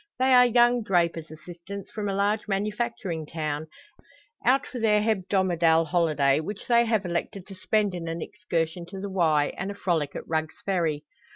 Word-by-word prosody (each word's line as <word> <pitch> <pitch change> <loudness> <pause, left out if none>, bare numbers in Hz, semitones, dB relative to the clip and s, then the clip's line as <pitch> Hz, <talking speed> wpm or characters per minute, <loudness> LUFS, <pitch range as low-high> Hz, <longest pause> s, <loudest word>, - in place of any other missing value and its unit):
They 260 +1 +3
are 250 0 +7
young 240 0 +4
drapers' 170 -5 0
assistants 175 +5 -9
from 210 -2 -3
a 195 - -2
large 205 +2 0
manufacturing 205 -5 -2
town, 155 -1 -3 0.8
out 270 +3 +3
for 255 - -7
their 215 -2 +3
hebdomadal 185 -6 +2
holiday, 150 -5 +2
which 200 +6 -6
they 235 -1 +4
have 220 -4 0
elected 180 +2 -3
to 195 - -11
spend 205 +1 0
in 170 -2 -5
an 165 +1 -3
excursion 170 -3 -3
to 190 +2 -8
the 200 0 -5
Wye, 155 -6 +2
and 190 - -3
a 200 - -5
frolic 160 -7 -1
at - - -6
Rugg's 160 -1 -2
Ferry. 165 -6 -1
190 Hz, 175 wpm, -26 LUFS, 165-210 Hz, 0.8 s, are